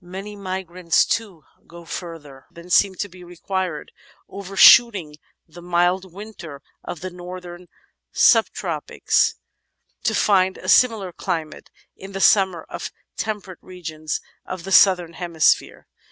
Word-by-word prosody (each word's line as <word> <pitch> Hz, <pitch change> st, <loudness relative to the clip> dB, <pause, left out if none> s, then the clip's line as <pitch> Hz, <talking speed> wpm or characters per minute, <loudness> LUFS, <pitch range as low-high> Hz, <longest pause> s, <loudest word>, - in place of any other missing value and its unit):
Many 195 Hz, +4 st, -8 dB
migrants, 185 Hz, -3 st, -1 dB
too, 195 Hz, -9 st, -3 dB, 0.2 s
go 170 Hz, 0 st, -13 dB
further 160 Hz, -6 st, -9 dB
than 170 Hz, +1 st, -13 dB
seems 190 Hz, +1 st, +3 dB
to 205 Hz, -, -3 dB
be 180 Hz, -1 st, -15 dB
required, 180 Hz, -2 st, -5 dB, 0.4 s
overshooting 195 Hz, -3 st, +5 dB, 0.3 s
the 175 Hz, +2 st, -13 dB
mild 180 Hz, +2 st, 0 dB
winter 175 Hz, -7 st, -10 dB, 0.2 s
of 165 Hz, -, -7 dB
the 185 Hz, 0 st, -6 dB
northern 180 Hz, 0 st, -10 dB, 0.4 s
subtropics -, -, +2 dB, 0.7 s
to -, -, 0 dB
fijid 190 Hz, -2 st, +2 dB
a -, -, -6 dB
similar 220 Hz, -7 st, +3 dB
climate 165 Hz, -3 st, -5 dB, 0.3 s
in 195 Hz, +1 st, -11 dB
the 195 Hz, -, -4 dB
summer 190 Hz, -4 st, +3 dB
of -, -, -7 dB, 0.2 s
temperate 205 Hz, -4 st, -5 dB
regions 160 Hz, -4 st, -6 dB, 0.2 s
of 185 Hz, -2 st, -7 dB
the 195 Hz, -, -7 dB
Southern 180 Hz, -3 st, +5 dB
Hemisphere. 170 Hz, -3 st, 0 dB
180 Hz, 125 wpm, -21 LUFS, 170-195 Hz, 0.7 s, overshooting